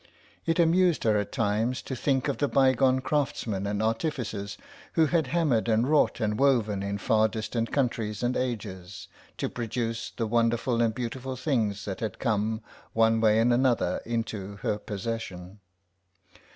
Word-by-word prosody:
It 165 Hz, +1 st, +2 dB
amused 175 Hz, -1 st, +3 dB
her 110 Hz, -2 st, +3 dB
at 105 Hz, -, -4 dB
times 115 Hz, +1 st, 0 dB
to 130 Hz, -, -4 dB
think 130 Hz, +1 st, 0 dB
of 140 Hz, -, -2 dB
the 145 Hz, -, +2 dB
bygone 130 Hz, -1 st, +3 dB
craftsmen 120 Hz, -8 st, -1 dB
and 105 Hz, +1 st, -1 dB
artificers 110 Hz, -4 st, -2 dB, 0.4 s
who 160 Hz, -, +4 dB
had 160 Hz, -2 st, +1 dB
hammered 130 Hz, -7 st, +1 dB
and 115 Hz, +3 st, +3 dB
wrought 150 Hz, -3 st, +3 dB
and 105 Hz, -1 st, -1 dB
woven 115 Hz, -8 st, +2 dB
in 100 Hz, +1 st, -2 dB
far 110 Hz, +1 st, +3 dB
distant 115 Hz, +1 st, -3 dB
countries 115 Hz, -5 st, -1 dB
and 120 Hz, +1 st, +1 dB
ages, 95 Hz, -7 st, -4 dB, 0.3 s
to -, -, -1 dB
produce 115 Hz, -1 st, -3 dB
the 115 Hz, -, -3 dB
wonderful 115 Hz, +1 st, +1 dB
and 115 Hz, -2 st, +1 dB
beautiful 130 Hz, +2 st, -4 dB
things 115 Hz, -7 st, -1 dB
that 95 Hz, -2 st, -4 dB
had 110 Hz, -5 st, -3 dB
come, 110 Hz, -1 st, 0 dB, 0.3 s
one 115 Hz, 0 st, +3 dB
way 110 Hz, -1 st, +4 dB
and 120 Hz, +2 st, +4 dB
another, 125 Hz, -1 st, +2 dB
into 110 Hz, -4 st, -3 dB
her 105 Hz, -, 0 dB
possession. 105 Hz, -3 st, -5 dB
115 Hz, 155 wpm, -27 LUFS, 105-130 Hz, 0.4 s, who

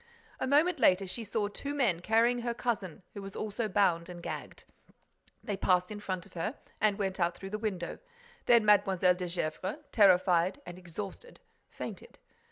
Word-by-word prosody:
A -, -, -1 dB
moment 305 Hz, +4 st, +3 dB
later, 190 Hz, -4 st, +4 dB
she 210 Hz, +5 st, -4 dB
saw 210 Hz, -1 st, -1 dB
two 280 Hz, +7 st, -5 dB
men 225 Hz, -12 st, +2 dB
carrying 230 Hz, +6 st, +3 dB
her 235 Hz, 0 st, -2 dB
cousin, 200 Hz, -9 st, -3 dB
who 200 Hz, -, -7 dB
was 195 Hz, 0 st, -8 dB
also 215 Hz, +2 st, -2 dB
bound 185 Hz, -4 st, +2 dB
and 175 Hz, -1 st, -9 dB
gagged. -, -, -6 dB, 0.8 s
They 205 Hz, -, -2 dB
passed 180 Hz, 0 st, +2 dB
in 210 Hz, -, -5 dB
front 185 Hz, -4 st, -4 dB
of -, -, -18 dB
her 215 Hz, -, -3 dB, 0.2 s
and 210 Hz, -2 st, +3 dB
went 195 Hz, -2 st, -2 dB
out 170 Hz, 0 st, +1 dB
through 195 Hz, 0 st, -8 dB
the 215 Hz, -, -3 dB
window. 190 Hz, -6 st, -3 dB, 0.5 s
Then 235 Hz, -3 st, +6 dB
Mlle. 200 Hz, -2 st, +4 dB
de 180 Hz, +1 st, +5 dB
Gesvres, 180 Hz, -, -3 dB
terrified 185 Hz, 0 st, +4 dB
and 175 Hz, +1 st, -9 dB
exhausted, 195 Hz, -, -8 dB, 0.3 s
fainted." -, -, -8 dB
200 Hz, 175 wpm, -31 LUFS, 180-225 Hz, 0.8 s, Then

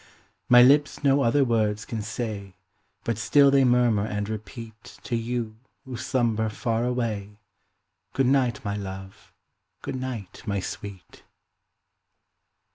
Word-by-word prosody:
My 125 Hz, 0 st, +9 dB
lips 145 Hz, +3 st, +4 dB
no 140 Hz, 0 st, +4 dB
other 135 Hz, +2 st, +3 dB
words 110 Hz, -3 st, 0 dB
can 115 Hz, -2 st, -4 dB
say, 105 Hz, -3 st, -5 dB, 0.5 s
But 115 Hz, -2 st, -2 dB
still 140 Hz, +5 st, +5 dB
they 135 Hz, -1 st, +5 dB
murmur 120 Hz, -4 st, +3 dB
and 105 Hz, -1 st, -3 dB
repeat 110 Hz, +1 st, -8 dB
To 120 Hz, -, -2 dB
you, 115 Hz, -1 st, -3 dB, 0.3 s
who 130 Hz, -2 st, -7 dB
slumber 120 Hz, -3 st, 0 dB
far 115 Hz, +1 st, -1 dB
away, 110 Hz, -5 st, -2 dB, 0.8 s
Good 135 Hz, -, +2 dB
night, 125 Hz, -4 st, +1 dB
my 100 Hz, 0 st, -1 dB
love! 95 Hz, -1 st, -8 dB, 0.5 s
good -, -, -4 dB
night, 120 Hz, -7 st, -6 dB
my 100 Hz, -1 st, 0 dB
sweet! 95 Hz, 0 st, -8 dB
115 Hz, 125 wpm, -25 LUFS, 105-125 Hz, 0.8 s, My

